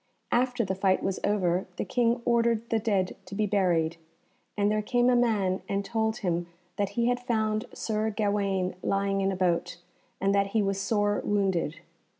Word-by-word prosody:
After 245 -1 +1
the 190 - -1
fight 190 0 +1
was 195 -1 -1
over, 185 -3 +1
the - - -3
King 235 +3 +1
ordered 235 -1 +2
the 225 - +3
dead 200 -4 0
to 195 - -7
be 215 +1 +1
buried; 175 -5 +1 0.6
and 205 0 +2
there 215 0 +1
came 245 +3 +2
a - - +4
man 210 -6 +1
and 200 0 -1
told 220 -1 0
him 175 -3 -1 0.3
that 200 -1 0
he 235 - +3
had 245 0 +1
found 220 -2 0
Sir 220 0 -1
Gawaine 200 -3 0
lying 195 0 0
in 195 0 +1
a - - -2
boat, 180 -2 0 0.4
and 195 +1 +2
that 200 0 +3
he 215 - +3
was 195 0 -1
sore 205 0 +1
wounded. 190 -5 0
205 Hz, 180 wpm, -28 LUFS, 190-225 Hz, 0.6 s, a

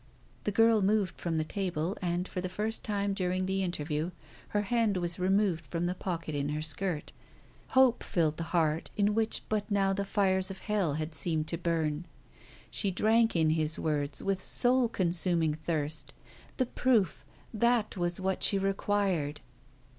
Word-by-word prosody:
The 210 - +1
girl 225 +1 +4
moved 200 -2 +1
from 165 -2 -1
the 155 - +1
table; 180 0 -2
and, 175 0 -1
for 180 - -4
the 185 - -3
first 210 +4 -2
time 200 -1 -1
during 185 -1 -1
the 190 +1 0
interview, 155 -2 -2 0.4
her 205 0 0
hand 220 -2 +1
was 175 0 -2
removed 190 -2 +2
from 170 +4 -3
the 175 - 0
pocket 170 -4 -4
in 145 0 -1
her 150 +1 -2
skirt. 155 +1 -1 0.7
Hope 260 -2 +6
filled 160 -3 0
the 165 - -3
heart 160 -2 +1
in 205 0 +3
which 220 0 0
but 210 -1 -1
now 195 -1 +2
the 200 +1 -1
fires 190 -1 +2
of 190 -1 -8
hell 195 -9 0
had 155 +1 -3
seemed 155 +1 0
to 170 - -1
burn. 165 -1 -1 0.6
She 200 - 0
drank 225 +4 +3
in 160 -2 +3
his 155 -1 0
words 145 -2 -1
with 195 -1 0
a - - -16
soul 245 +4 +2
consuming 170 -4 +1
thirst 155 -2 -3 0.4
The 255 - +2
proof! 220 - +1 0.3
That 235 0 +2
was 175 -1 -1
what 190 0 -1
she 200 - +3
required. 195 -6 0
185 Hz, 170 wpm, -30 LUFS, 160-205 Hz, 0.7 s, Hope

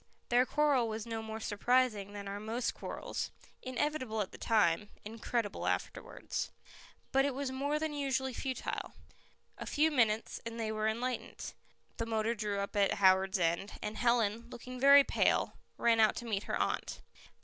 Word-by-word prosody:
Their 245 +1 +4
quarrel 290 -5 +3
was 220 -1 -4
no 225 -1 -3
more 220 0 -6
surprising 215 -1 +1
than 200 -1 -6
are 200 +1 -4
most 225 +3 -2
quarrels - - -4 0.3
inevitable 255 -3 -2
at 190 - -4
the - - -11
time, 205 -2 +2 0.2
incredible 225 0 -2
afterwards. - - -3 0.6
But 270 0 +4
it 280 -2 0
was 275 -1 -2
more 285 +3 0
than 310 0 -2
usually 265 -2 -1
futile. 260 +1 -4 0.7
A - - -6
few 315 +2 +3
minutes, 225 -5 +1
and 230 0 -6
they 220 -1 -1
were 215 0 0
enlightened. 245 +3 -3 0.4
The 230 - -2
motor 225 0 +1
drew 205 -2 -2
up 200 - -5
at 200 -1 +3
Howards 190 0 +4
End, 170 +3 0
and 210 - -4
Helen, 235 -1 +1
looking 250 +1 -8
very 280 +1 +8
pale, - - +1 0.2
ran 230 -1 +3
out 215 -1 +5
to 240 - -5
meet 210 -3 -2
her - - -1
aunt. - - -2
230 Hz, 165 wpm, -33 LUFS, 210-255 Hz, 0.7 s, very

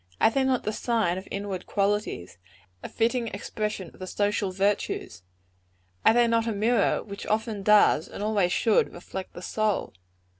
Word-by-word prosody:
Are - - +5
they 270 +3 +1
not 260 -2 +1
the 215 - -2
sign 215 -7 0
of 190 - -13
inward 200 -2 -4
qualities 200 - -1 0.4
a - - -7
fitting 235 +1 0
expression 210 -3 -4
of - - -20
the 185 - -6
social 205 0 0
virtues? 195 - -1 0.8
Are - - +6
they 240 0 +5
not 230 0 +1
a - - +1
mirror 220 +1 +2
which 200 -1 -8
often 215 -1 -1
does, 205 -6 +5
and 205 - -7
always 205 -4 +1
should, 225 +2 +2
reflect 185 +2 -7
the 175 - -9
soul? 215 0 -1
210 Hz, 165 wpm, -26 LUFS, 195-225 Hz, 0.8 s, Are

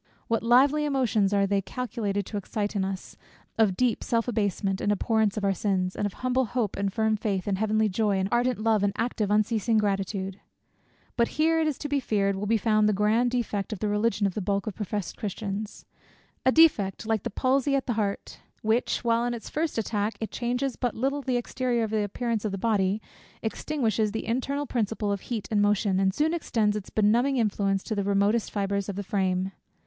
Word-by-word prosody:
What 230 -1 +1
lively 270 +6 +4
emotions 250 -8 +1
are 200 -1 +3
they 200 0 +1
calculated 205 -3 -3
to 210 - -5
excite 205 +1 -3
in 195 - +1
us 190 -1 -5 0.4
of 200 -5 +3
deep 245 -3 +1
self 230 0 0
abasement, 200 -4 -1
and 205 - +1
abhorrence 215 0 +1
of 210 - -2
our 195 -1 +2
sins; 185 -2 -1
and 205 - 0
of 200 - -8
humble 255 +1 0
hope, 225 -3 -2
and 200 0 -1
firm 220 +1 +1
faith, 200 -3 -2
and 195 -2 -1
heavenly 215 0 +2
joy, 205 0 +1
and 190 0 0
ardent 245 +1 +2
love, 220 -1 +2
and 200 -1 +1
active 225 -3 -1
unceasing 215 +1 +2
gratitude! 195 -1 -1 0.8
But 235 -1 +3
here, 325 +1 +3
it 320 - +2
is 300 - -1
to 295 - -4
be 285 -1 +1
feared, 200 -5 0
will 200 +2 -3
be 225 +1 +3
found 215 0 +3
the - - +2
grand 215 +5 +2
defect 230 -4 -2
of 215 - -3
the 210 - -2
religion 210 0 +1
of 195 - 0
the 210 - -3
bulk 200 +1 -1
of 215 - -3
professed 205 -1 -4
Christians; 205 +1 -5 0.6
a - - +7
defect, 225 - +4
like 220 -2 0
the - - -3
palsy 270 +5 +1
at 270 - 0
the 245 - 0
heart, 205 -2 -3 0.2
which, 225 +4 +1
while 230 0 +2
in 240 0 -1
its 230 - -9
first 310 -2 -1
attack, 215 -1 -1
it 220 - -4
changes 250 +2 -1
but 245 -3 -2
little 275 +4 -1
the 255 -2 0
exterior 245 -1 -1 0.2
appearance 225 +2 -2
of 215 - -1
the 195 - -3
body, 205 -1 +1 0.4
extinguishes 220 -2 -1
the 220 - -3
internal 275 +5 -1
principle 220 -4 -1
of 200 -2 -2
heat 225 -4 -4
and 210 -1 +3
motion, 205 -2 +2
and 190 0 +3
soon 310 +2 +1
extends 220 -10 0
its 210 -2 -5
benumbing 235 +6 +2
influence 200 -3 +1
to 220 - -3
the 200 -1 -1
remotest 200 +3 +2
fibres 200 -1 -2
of 200 - -3
the 205 - -3
frame. 190 -1 0
215 Hz, 205 wpm, -27 LUFS, 200-240 Hz, 0.8 s, a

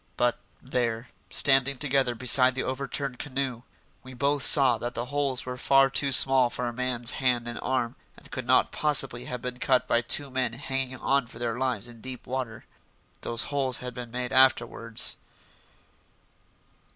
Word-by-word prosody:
But, 120 0 +1 0.2
there, 120 -2 -3 0.2
standing 135 -1 +3
together 135 -3 0
beside 125 +1 +4
the 130 - -2
over 130 +1 -4
turned 135 -4 -3
canoe, 130 -4 -4 0.4
we 130 0 -12
both 140 +3 0
saw 130 -4 +5
that 120 +1 -5
the 120 - -3
holes 140 -3 -1
were 125 0 -6
far 135 +1 +3
too 140 0 +1
small 130 -1 +6
for 125 - -4
a 120 - -4
man's 125 -1 -1
hand 125 -2 +1
and 120 - -5
arm 125 -1 -2 0.2
and - - -17
could 130 -3 -6
not 130 - +3
possibly 135 -5 0
have 125 -1 -6
been 125 0 -5
cut 130 -1 +1
by 120 - +2
two 140 +3 +1
men 130 -3 -1
hanging 135 0 -4
on 135 0 0
for 115 - -13
their 115 -1 -3
lives 130 -2 -2
in 120 -2 -13
deep 130 0 -9
water. 125 -4 -5 0.6
Those 115 -1 0
holes 135 -3 +1
had 125 0 -7
been 120 -1 -8
made 125 +2 -5
afterwards. 120 -3 +2
130 Hz, 175 wpm, -26 LUFS, 120-135 Hz, 0.6 s, small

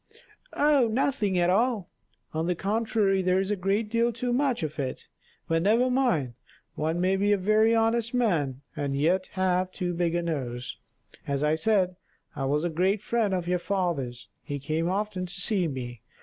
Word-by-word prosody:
"Oh! 290 -4 +4
nothing 220 -5 0
at 175 0 +3
all. 220 -2 +1 0.4
On 160 +1 -1
the 180 - +1
contrary 205 0 +1
there 185 0 +2
is 195 +1 -1
a - - +2
great 200 +3 0
deal 230 +2 +1
too 240 +2 -2
much 260 - +1
of 155 -1 -4
it; 130 -2 -4 0.4
but 165 0 +1
never 230 +7 +3
mind, 235 - +1 0.4
one 160 +3 -1
may 185 +2 +2
be 200 +2 +2
a 205 - +4
very 215 +4 +3
honest 225 +1 +1
man, 160 - 0
and 140 -2 -2
yet 180 +5 +2
have 185 -1 +1
too 180 -1 -3
big 170 -1 0
a 175 - 0
nose. 125 -7 -4 0.5
As 140 0 -1
I 150 +1 +3
said, 185 0 +1 0.4
I 135 -2 -2
was 145 +3 +1
a 175 - 0
great 190 +5 +1
friend 230 -3 +1
of 180 -2 -1
your 180 0 +1
father's; 170 -10 -2
he 145 - -5
came 155 +4 -1
often 190 -1 -2
to 175 - -11
see 190 -2 +1
me. 120 -5 -6
185 Hz, 185 wpm, -27 LUFS, 160-215 Hz, 0.5 s, Oh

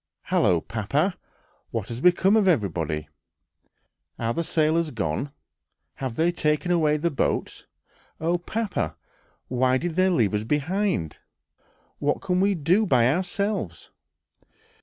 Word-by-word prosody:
"Hallo, 85 -3 +2
papa! 140 - -1 0.5
what 115 -4 -4
has 120 +1 -5
become 180 +4 +4
of 215 -3 +3
everybody? 80 - 0 1.1
Are 115 0 -1
the 170 - -1
sailors 160 0 +1
gone? 110 - -3 0.7
Have 130 -4 -4
they 165 +5 +2
taken 150 +1 0
away 155 -3 +3
the 170 +3 0
boats? 135 - -2 0.5
Oh, 170 +2 0
papa! 215 +4 -2 0.5
why 130 +1 +2
did 170 +4 -4
they 185 0 +4
leave 115 - +2
us 105 0 0
behind? 150 - -1 0.8
What 145 0 0
can 185 -2 0
we 200 +1 +3
do 180 +7 +2
by 125 -3 +4
ourselves?" 185 - -3
155 Hz, 125 wpm, -25 LUFS, 115-180 Hz, 1.1 s, become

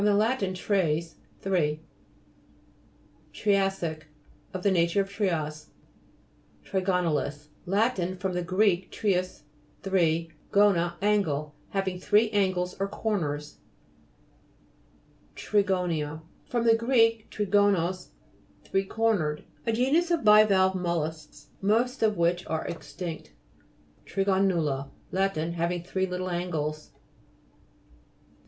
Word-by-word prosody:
lat. 210 +5 +2
tres, 170 -4 0 0.3
three 175 -6 +1
(p. 155 - -20 1.6
49). 200 -2 +4
TRIA'SSIC 160 -5 -5 0.5
Of 185 -1 -6
the 200 - +3
nature 170 +1 +2
of 195 0 -5
trias. 155 -7 -2 1.0
TRIGONA'LIS 170 -6 -1 0.2
Lat. 215 +6 +2 0.2
fr. 190 0 -1
gr. 185 +4 +1 0.3
treis, 185 -3 -1 0.4
three, 165 -4 +1 0.2
gonia, 195 -4 +3
angle. 155 -8 +1 0.2
Having 190 -2 -2
three 210 +3 +3
angles 185 -3 0
or 195 - 0
corners. 150 -9 -3 1.8
TRIGO'NIA 180 -7 0 0.2
fr. 245 - -3
gr. 230 +2 +2 0.4
trigonos, 195 -3 +1 0.6
three 195 0 0
cornered. 190 -9 0 0.2
A - - +3
genus 270 +10 +2
of 340 -5 +1
bivalve 210 -3 +6
mol 175 -3 0
lusks 150 -1 -8
most 235 +6 +1
of 215 -2 +2
which 170 +1 +1
are 160 0 -2
extinct. 170 - -7 0.7
THIGO'NULA 185 -8 +1 0.2
Lat. 195 -2 0
Having 170 +2 -2
three 190 +1 -1
little 180 0 -3
angles. 155 -4 -3
185 Hz, 100 wpm, -27 LUFS, 165-205 Hz, 1.8 s, bivalve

